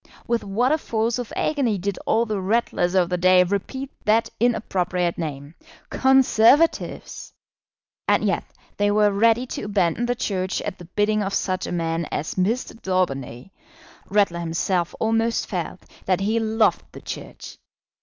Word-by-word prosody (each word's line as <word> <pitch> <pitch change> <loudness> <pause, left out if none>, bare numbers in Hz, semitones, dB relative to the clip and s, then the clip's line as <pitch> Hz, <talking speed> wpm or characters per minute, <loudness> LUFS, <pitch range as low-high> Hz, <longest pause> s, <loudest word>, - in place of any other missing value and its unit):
With 235 0 0
what 220 +7 +1
a 310 - +2
force 230 -2 -1
of 245 - -5
agony 260 -9 0
did 195 +1 -3
all 230 +1 +3
the 210 -3 -2
Ratlers 190 -3 0
of 180 -2 +4
the 180 -1 -1
day 185 0 +6
repeat 205 +9 -3
that 225 +2 +2
inappropriate 185 -7 0
name! 145 -2 -5 0.4
Conservatives! 265 +3 +3 0.7
And - - +3
yet - - 0 0.3
they 205 0 +2
were 210 0 +3
ready 230 +4 +3
to - - -6
abandon 200 +2 0
the 245 - 0
Church 190 -4 -2
at - - -5
the 175 - -10
bidding 210 +4 0
of 195 -1 -2
such 185 -1 -1
a - - -5
man 165 -1 -1
as 155 - -3
Mr. 225 +5 -1
Daubeny! 135 -7 -2 0.6
Ratler 200 -4 +2
himself 170 +1 -1
almost 225 +1 +1
felt - - -5 0.2
that 185 0 +2
he 220 +3 +1
loved 220 0 +2
the - - -10
Church. - - -8
205 Hz, 155 wpm, -23 LUFS, 180-230 Hz, 0.7 s, day